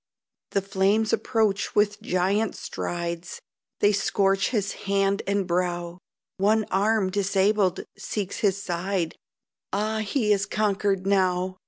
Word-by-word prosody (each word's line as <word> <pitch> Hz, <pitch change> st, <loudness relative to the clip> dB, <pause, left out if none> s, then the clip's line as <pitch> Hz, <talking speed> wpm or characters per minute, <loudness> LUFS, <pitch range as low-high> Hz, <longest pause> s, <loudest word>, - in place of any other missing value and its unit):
The 200 Hz, -, 0 dB
flames 200 Hz, +3 st, +1 dB
approach 215 Hz, -4 st, 0 dB
with 205 Hz, 0 st, +2 dB
giant 200 Hz, +2 st, 0 dB
strides, 170 Hz, 0 st, -4 dB, 0.4 s
They 205 Hz, -, +5 dB
scorch 195 Hz, -1 st, +1 dB
his 205 Hz, -5 st, -1 dB, 0.2 s
hand 195 Hz, 0 st, +2 dB
and 200 Hz, -1 st, +1 dB
brow; 175 Hz, 0 st, -2 dB, 0.4 s
One 215 Hz, +2 st, +2 dB
arm, 200 Hz, 0 st, +2 dB
disabled, 195 Hz, -1 st, +2 dB, 0.2 s
seeks 200 Hz, -3 st, -4 dB
his 195 Hz, -2 st, +2 dB
side, 180 Hz, -2 st, -2 dB, 0.6 s
Ah! 215 Hz, +2 st, -1 dB
he 215 Hz, 0 st, +1 dB
is 200 Hz, 0 st, 0 dB
conquered 200 Hz, -2 st, 0 dB
now! 185 Hz, -1 st, +1 dB
195 Hz, 120 wpm, -25 LUFS, 185-210 Hz, 0.6 s, They